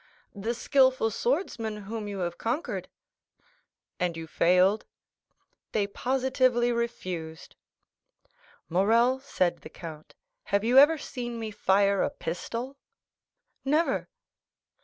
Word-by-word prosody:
"The 225 +4 -3
skilful 260 -3 +3
swordsman 235 - -1
whom 215 +1 -5
you 200 -2 -4
have 175 -1 -3
conquered." 250 +9 -3 1.1
"And 175 -2 -1
you 165 - -5
failed?" 180 +5 +3 0.9
"They 210 -2 +2
positively 255 +1 +1
refused." 180 -9 -4 1.1
"Morrel," 230 +9 +3
said 185 -10 0
the - - -11
count, 155 -3 -10 0.3
"have 200 +1 +1
you 245 +4 +6
ever 305 +3 +7
seen 240 -4 -5
me 220 -1 -4
fire 200 -1 +2
a - - +1
pistol?" 235 +10 -5 0.9
"Never." 305 +5 +1
225 Hz, 105 wpm, -28 LUFS, 190-255 Hz, 1.1 s, ever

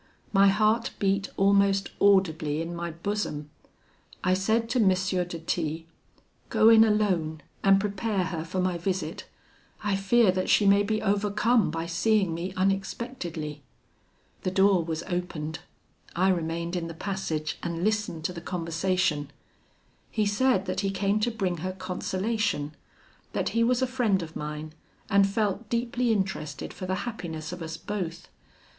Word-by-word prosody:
My 195 0 +6
heart 215 +3 +3
beat 195 0 0
almost 200 0 +3
audibly 160 -7 +3
in 165 +1 -4
my 170 0 -3
bosom. 170 -4 -3 0.7
I 185 - +3
said 220 +5 +1
to 250 - +2
M. 205 -4 +5
de 185 -2 0
T, 165 -1 -2 0.6
'Go 220 - +5
in 225 -1 +8
alone, 185 -8 +1 0.2
and 195 0 +6
prepare 205 0 -1
her 165 -2 -3
for 180 +3 -4
my 180 -1 0
visit; 190 +2 -3 0.6
I 205 -1 +1
fear 195 +2 +4
that 185 0 -2
she 205 - +5
may 200 0 +6
be 215 +1 -1
overcome 210 +2 +2
by 165 +1 -3
seeing 190 +1 +2
me 170 +3 -3
unexpectedly.' 185 - -2 0.8
The - - -1
door 190 -1 +4
was 160 0 -3
opened. 170 -3 -4 0.6
I 185 +3 +3
remained 170 -1 -1
in 170 -2 -2
the 165 - -7
passage, 165 -5 -3
and 170 0 -3
listened 210 -6 -1
to 180 - -1
the 170 - -7
conversation. 170 -3 -1 0.8
He 215 -2 0
said 205 0 +2
that 185 - -2
he 195 0 0
came 200 +1 +1
to 215 - +1
bring 190 -6 -2
her 185 +3 -3
consolation; 190 -4 -2 0.6
that - - 0
he 230 - +2
was 250 +2 +2
a - - +4
friend 240 -8 +1
of 160 0 -9
mine, 150 +1 -5 0.4
and 200 -1 +5
felt 205 +1 -1
deeply 240 0 0
interested 190 -9 -2
for 185 - -6
the 185 - 0
happiness 170 -9 -5
of 180 -1 -7
us 160 0 -5
both. 175 -4 -5
190 Hz, 155 wpm, -27 LUFS, 170-210 Hz, 0.8 s, in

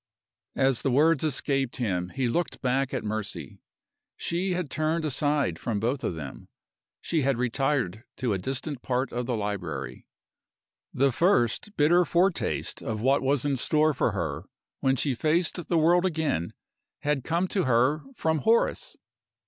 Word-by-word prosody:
As 135 -2 +2
the 135 - 0
words 150 +4 +3
escaped 135 -3 0
him 90 -7 -1
he 130 +4 -1
looked 170 +8 -1
back 130 +1 0
at 130 - -2
Mercy. 110 -1 -4 0.6
She 180 +2 -1
had 175 -5 -3
turned 155 +1 0
aside 145 - 0
from 105 +2 -2
both 125 +6 -1
of 85 - -1
them 70 -4 -8 0.5
she 165 -3 0
had 135 -2 +1
retired 125 -4 0
to 125 -4 0
a 95 - -1
distant 135 - -4
part 130 +1 -1
of 120 0 -2
the 125 - 0
library 100 -5 -4 0.8
The 135 +1 +2
first 165 - +1
bitter 170 +5 +5
foretaste 175 +2 0
of 110 -1 -3
what 135 +5 +3
was 135 0 +1
in 140 -1 +1
store 155 +4 +2
for 120 -4 0
her 80 -7 -3 0.3
when 135 0 +2
she 135 +1 0
faced 160 +6 0
the 170 - +2
world 175 +3 +4
again 155 - -1 0.5
had 145 -3 0
come 170 +5 0
to 190 -5 0
her 130 +5 +3
from 160 -6 0
Horace! 225 +5 +1
135 Hz, 155 wpm, -27 LUFS, 120-155 Hz, 0.8 s, bitter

